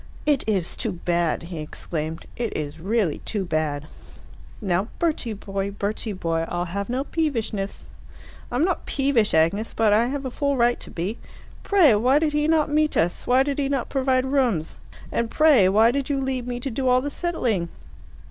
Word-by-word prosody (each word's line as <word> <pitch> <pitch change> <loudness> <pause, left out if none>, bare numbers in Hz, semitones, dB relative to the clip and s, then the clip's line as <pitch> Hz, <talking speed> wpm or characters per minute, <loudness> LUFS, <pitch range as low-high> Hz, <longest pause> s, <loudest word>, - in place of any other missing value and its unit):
"It 290 -3 +2
is 190 -6 0
too 225 -5 -2
bad!" 170 -2 0
he 170 -1 -7
exclaimed. 155 +1 -5
"It 235 -2 -3
is 150 0 -5
really 195 -3 0
too 205 -3 -3
bad." 155 -3 -1 0.7
"Now, 190 0 0
Bertie 305 -9 0
boy, 195 -1 -4
Bertie 205 +2 -3
boy! 165 -3 -1
I'll 175 0 -2
have 200 +4 -4
no 255 +2 -1
peevishness." 230 -11 -2 0.6
"I - - -3
am 285 +6 +3
not 370 -2 -2
peevish, 270 - +1
Agnes, 170 +8 +1
but 220 -2 +3
I 225 +3 +4
have 275 +1 -3
a 260 - -3
full 280 +1 0
right 240 0 +3
to - - -8
be. 185 +7 -4 0.4
Pray, 360 - +5
why 250 +7 +3
did 305 -1 +1
he 300 0 +1
not 315 -2 +3
meet 305 0 +1
us? 170 +2 0
Why 255 +2 +5
did 280 0 -2
he 275 -1 0
not 275 -3 -1
provide 260 -1 +1
rooms? 255 - 0 0.3
And 230 -1 -1
pray, 280 -12 +5
why 220 +4 +5
did 280 +1 -2
you 280 -1 0
leave 260 -2 -2
me 245 -1 -3
to 270 - -2
do 260 +3 -1
all 250 0 +4
the 290 +2 -4
settling? 240 - -1
230 Hz, 190 wpm, -24 LUFS, 185-275 Hz, 0.7 s, Pray